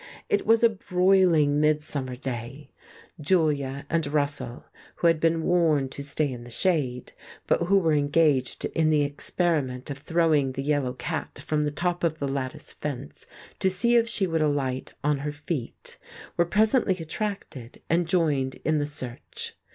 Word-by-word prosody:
It 415 - +1
was 225 +1 +5
a 235 - +7
broiling, 180 -7 +3
midsummer 150 -4 0
day; 130 +2 -6 0.5
Julia 145 -4 +1
and 165 -2 0
Russell, 145 -4 -2 0.3
who - - -3
had 165 -2 +5
been 165 0 +2
warned 155 -7 +2
to 140 - -6
stay 145 0 0
in 120 -1 -8
the 120 - -11
shade, 130 -4 0 0.3
but 170 - +1
who 200 +2 +5
were 165 -5 +2
engaged 145 -3 +2
in 160 -1 +1
the 150 -2 +3
experiment 145 -3 -1
of 140 - -6
throwing 155 -3 +2
the 135 - -4
yellow 140 -3 0
cat 125 - -4
from 155 -1 0
the 150 - +1
top 175 +4 -2
of 160 -2 +1
the 140 - -2
lattice 135 -1 -4
fence 135 - -6 0.3
to 190 - +3
see 230 +6 +2
if 230 0 +3
she 210 -4 +1
would 165 -3 0
alight 135 -4 -1
on 145 -1 +1
her 145 +1 -3
feet, 145 -3 -5 0.4
were 170 - +3
presently 215 +2 +3
attracted, 165 - -5
and 170 +1 +1
joined 150 -7 +1
in 155 0 +2
the 145 - -1
search. 130 -4 -5
150 Hz, 165 wpm, -26 LUFS, 140-170 Hz, 0.5 s, a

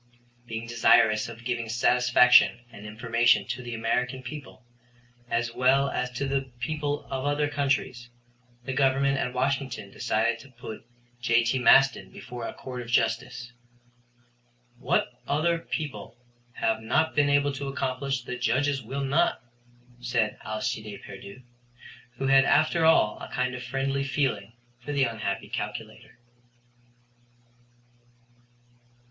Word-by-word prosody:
Being 115 0 -5
desirous 110 -2 +3
of 115 0 -11
giving 120 -2 -2
satisfaction 125 +1 +5
and 105 -2 -10
information 115 0 +2
to 125 0 -3
the 120 -1 -6
American 125 +3 -1
people, 130 -1 -9 0.6
as 120 0 -1
well 135 +3 +3
as 125 0 -2
to 140 +2 -2
the 135 -1 -2
people 145 +2 -3
of 130 -1 -2
other 145 0 +1
countries, 135 -4 -1 0.6
the 130 - -3
Government 135 0 +2
at 125 - -1
Washington 130 -5 -2
decided 115 +3 0
to 135 - -14
put 115 -2 -10 0.3
J.T. 120 +1 +2
Maston 135 +2 +5
before 125 -2 -8
a - - -6
court 125 -2 -7
of 120 - -9
justice. 125 0 0 1.3
"What - - +1 0.2
other 165 +3 +1
people 145 -7 -6 0.4
have 110 -1 -1
not 150 +8 +1
been 145 -1 +3
able 145 0 +2
to 140 +1 -5
accomplish 135 -1 -2
the 125 - -5
Judges 135 +3 +1
will 135 +4 -4
not," 140 0 +1 0.6
said 120 -3 -1
Alcide 110 -1 -4
Pierdeux, 100 +5 -11 0.7
who 135 - -3
had 135 0 +6
after 155 +3 +3
all 105 -9 +4
a - - -7
kind 125 0 -1
of 125 - -6
a - - -8
friendly 135 +2 -1
feeling 130 -6 -1 0.3
for 145 +4 -6
the 140 -1 +2
unhappy 110 -5 -2
calculator. - - -6
125 Hz, 130 wpm, -27 LUFS, 115-135 Hz, 1.3 s, had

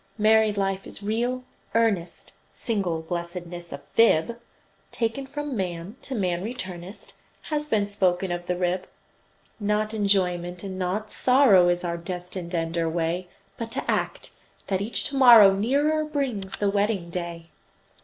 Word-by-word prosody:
Married 215 -1 +4
life 195 -1 -1
is - - -8
real, 240 +4 -1 0.3
earnest, 215 -7 0 0.2
Single 185 -8 -2
blessedness 175 0 -6
a - - -4
fib, 230 +1 +2 0.5
Taken 235 +4 -2
from 295 0 -4
man, 180 0 -4
to 270 - -5
man 180 -4 -1
returnest, 190 -5 -5 0.3
Has 300 -1 -3
been 210 -2 +2
spoken 190 -2 0
of 175 0 -4
the 180 - 0
rib. 180 +1 -1 0.7
Not 210 +1 0
enjoyment, 180 -4 0
and 190 -1 -5
not 200 +4 -2
sorrow, 250 -9 +5
Is 175 0 0
our 170 -1 -2
destined 180 0 -6
end 165 0 -1
or 165 -1 +1
way; 170 +2 -1 0.3
But 230 -1 -5
to - - -3
act, - - -2 0.4
that 190 -1 0
each 215 +4 -2
to 275 - -3
morrow 235 -7 +9
Nearer 285 +10 +1
brings 265 -11 -3
the 205 -1 +1
wedding 200 -4 0
day. 170 -1 -5
195 Hz, 145 wpm, -25 LUFS, 175-225 Hz, 0.7 s, morrow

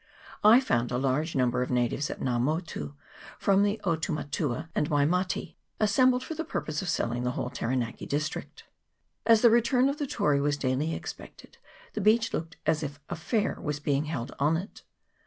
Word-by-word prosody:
I 220 +4 +8
found 120 - 0
a 125 - 0
large 140 +5 0
number 125 -1 +2
of 125 - -2
natives 125 +3 0
at - - -5
Nga 125 -2 0
Motu 155 +1 -2 0.4
from 195 0 +3
the 205 +2 +1
Otumatua 155 -4 -2
and 150 - 0
Waimate, 170 +6 0 0.3
as 215 -2 +2
sembled 255 +2 +4
for 320 - -5
the 325 +1 -3
purpose 155 - -3
of 190 - -3
selling 120 -3 -1
the 125 - 0
whole 125 - -3
Tara 125 - -2
naki 120 -2 -3
district. 150 +2 -3 0.6
As 225 -2 +6
the 235 - +7
return 240 +3 +4
of 280 - -3
the 290 - -1
Tory 145 - +1
was 145 0 +1
daily 140 +4 0
expected, - - -9 0.3
the 215 - -2
beach 220 +3 +3
looked 165 +1 -4
as 160 0 +2
if 145 -2 -5
a - - -1
fair 210 +6 -1
was 150 -1 -2
being 145 0 0
held 145 -6 -4
on 150 +3 +3
it. 190 +6 -8
155 Hz, 190 wpm, -28 LUFS, 135-205 Hz, 0.6 s, I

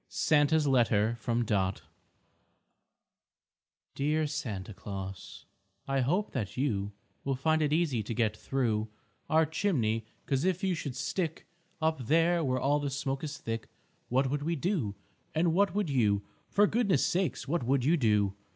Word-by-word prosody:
SANTA'S 150 0 +3
LETTER 115 -4 +3
FROM 120 +1 0
DOT 95 -2 0 2.1
Dear 150 +3 +1
Santa 110 -9 -4
Claus, 95 -1 -7 0.4
I 135 0 +1
hope 175 +11 +1
that 110 -5 -4
you 105 -7 -1 0.3
Will 135 -1 0
find 155 +4 +1
it 150 -1 +1
easy 150 -7 +1
to 110 +3 -4
get 110 -3 +1
through 110 -3 -1 0.4
Our 160 0 +4
chimney, 125 - 0 0.2
'cause 135 0 0
if 185 +1 0
you 190 -1 +2
should 145 -6 -4
stick 160 +4 -2 0.4
Up 155 -7 0
there 165 +2 +3
where 130 -2 0
all 145 +3 +2
the 145 -1 -2
smoke 135 0 -3
is 150 -1 -4
thick, 115 0 -5 0.4
What 130 +1 +2
would 145 0 -1
we 165 +3 -1
do, 150 - -1 0.4
and 165 +1 +2
what 195 0 +2
would 205 -7 0
you, 105 -6 +2 0.3
For 205 - +4
goodness 205 - +2
sakes, 165 -9 -1
what 170 +3 0
would 130 +1 +1
you 160 +4 +4
do? 105 - +2
135 Hz, 155 wpm, -30 LUFS, 115-160 Hz, 2.1 s, Our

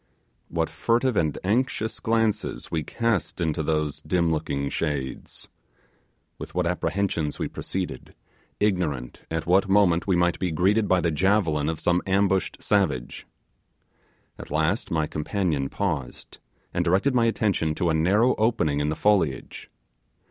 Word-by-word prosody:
What - - -1
furtive 120 +1 +1
and 80 -6 +1
anxious 110 +1 0
glances 115 -2 -1
we 80 - 0
cast 115 +5 -1
into 80 -3 0
those 75 -1 -1
dim 85 -2 +1
looking 75 -3 -1
shadows! 70 -5 -4 0.9
With - - -8
what - - +1
apprehensions 90 -6 -1
we - - -2
proceeded, 95 -1 -5 0.4
ignorant 85 - -1
at 80 0 -2
what 95 +3 +3
moment 95 -4 +3
we 95 - +3
might 85 0 +1
be 90 - 0
greeted 100 +6 +2
by 95 -1 +3
the 85 - +1
javelin 80 -3 +2
of 80 -1 -3
some 90 +1 +2
ambushed 95 -1 +1
savage. 95 -12 0 1.1
At - - -9
last 80 +8 0
my 80 -2 +1
companion 75 -3 -1
paused, 80 -11 -4 0.3
and 85 - +1
directed 95 +11 +2
my 120 -2 +3
attention 100 -8 0
to 85 0 +1
a - - +1
narrow 100 +10 +3
opening 105 -10 +1
in 75 +1 0
the 75 - -1
foliage. 80 -12 0
90 Hz, 140 wpm, -25 LUFS, 80-100 Hz, 1.1 s, what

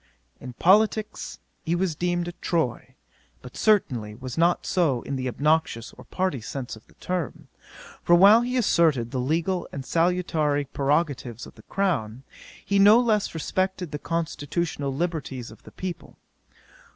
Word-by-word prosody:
'In 125 -1 -8
politicks 210 - +2 0.3
he 165 - 0
was 175 -2 -1
deemed 175 +1 -1
a - - -3
Tory, 170 -6 -2 0.5
but 125 - -11
certainly 125 - +1
was 125 +1 -7
not 170 +1 +2
so 150 -10 +1
in 140 - -4
the 130 -1 -3
obnoxious 145 -3 0
or - - -14
party 185 -9 -2
sense 125 +2 -6
of 110 - -18
the - - -23
term; 180 -5 -4 0.5
for 175 - +5
while 200 +6 +7
he 250 +1 -1
asserted 155 - +2
the 130 - -2
legal 165 +7 -1
and 135 -1 -6
salutary 165 -4 +1
prerogatives 140 -4 -1
of - - -13
the - - -16
crown, 135 - -2 0.4
he 200 0 +2
no 210 +4 +8
less 215 -7 +1
respected 185 +1 -2
the 150 - -4
constitutional 160 -2 -2
liberties 140 -6 -3
of 110 - -15
the - - -14
people. 185 -2 -7
165 Hz, 150 wpm, -25 LUFS, 135-180 Hz, 0.5 s, no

